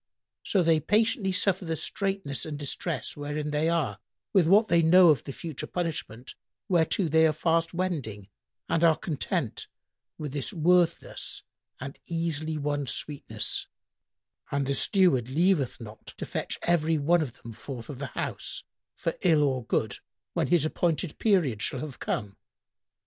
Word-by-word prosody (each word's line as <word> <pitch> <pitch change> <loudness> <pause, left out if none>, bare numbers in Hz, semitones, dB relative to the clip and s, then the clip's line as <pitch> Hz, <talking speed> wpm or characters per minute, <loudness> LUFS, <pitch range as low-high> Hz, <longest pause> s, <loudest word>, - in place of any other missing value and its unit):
So 190 -3 +1
they 165 -1 +4
patiently 210 +3 +2
suffer 185 +1 +1
the 165 -2 -2
straitness 190 - -2
and 155 -2 -4
distress 145 -1 -3
wherein 150 +1 -3
they 150 +2 +1
are, 145 -12 0 0.3
with 185 -5 +5
what 210 +5 +6
they 170 -4 +4
know 175 +2 +7
of 145 -7 +3
the - - -5
future 155 0 -6
punishment 155 -9 -4 0.3
whereto 175 +1 +2
they 160 +1 +5
are - - +3
fast 165 +2 +1
wending, 140 - -3 0.4
and 165 - +1
are 165 -2 +6
content 155 - -3 0.5
with 150 -3 -5
this 145 +5 -3
worthless 175 0 +1 0.4
and 135 +2 -7
easily 160 -2 -1
won 145 -1 -2
sweetness; 145 +3 -2 0.8
and 140 -1 0
the 140 - 0
Steward 140 - +3
leaveth 160 -2 +2
not 110 -2 -11
to - - -4
fetch - - -4
every 165 -2 +2
one 165 +4 +3
of 130 -5 -5
them 115 - -7
forth 120 +1 -8
of 135 -4 -7
the 140 - -3
house, - - -4 0.3
for - - -2
ill 160 -4 +4
or 130 -4 0
good, 110 -2 -1 0.3
when - - 0
his 170 -4 +3
appointed 165 0 -1
period 165 - +2
shall 130 - 0
have 145 -5 -7
come. 100 -1 -3
155 Hz, 155 wpm, -28 LUFS, 140-175 Hz, 0.8 s, know